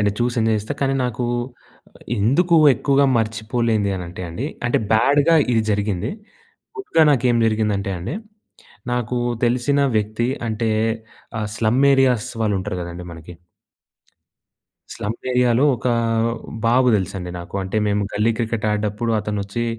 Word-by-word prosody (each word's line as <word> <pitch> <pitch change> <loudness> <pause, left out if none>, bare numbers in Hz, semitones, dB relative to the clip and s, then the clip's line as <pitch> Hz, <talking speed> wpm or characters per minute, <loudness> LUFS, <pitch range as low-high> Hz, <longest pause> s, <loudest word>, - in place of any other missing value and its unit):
అండి. 105 -1 +2
చూసి 120 +1 0
ఎంజాయ్ 110 -1 +2
జెస్తా. 110 +8 -5
కనీ 135 0 +1
నాకు 125 0 -2 0.7
ఆహ్, - - -21 0.2
ఎందుకు 165 - +3 0.2
ఎక్కువగా 140 +3 +2
మర్చిపోలేనిది 110 -1 0
అని 90 - -5
అంటే 90 +1 -8
అండి, 110 +12 -4 0.2
అంటే - - +2
బ్యాడ్‌గా 145 +8 +4 0.2
ఇది 115 -1 +3
జరిగింది. 100 0 -1 0.7
గుడ్‌గా 165 - +2
నాకేం 125 -3 +2
జరిగిందంటే 105 -2 0
అండి 95 - -4 0.8
నాకు 125 0 -1 0.3
తెలిసిన 125 +4 +1 0.2
వ్యక్తి 110 +3 -1 0.2
అంటే 110 +1 -1 0.7
ఆహ్, 105 -1 -2
స్లమ్ 115 +4 +2
ఏరియాస్ 125 -3 +2
వాళ్ళుంటరు 100 -3 -1
గదండీ 85 +1 -7
మనకి. 80 +1 -11 1.6
స్లమ్ 105 +2 -3 0.2
ఏరియాలో 125 +1 +3
ఒక - - -6 0.8
బాబు 125 +2 +4
దెలుసండి 90 -1 -4
నాకు. 85 +2 -10
అంటే 95 +3 -4
మేము 105 0 +1
గల్లీ 105 +3 +2
క్రికెట్ 115 -2 -2
ఆడేటప్పుడు 105 +2 -1
అతనొచ్చి 105 +2 -3
110 Hz, 130 wpm, -21 LUFS, 105-125 Hz, 1.6 s, బ్యాడ్‌గా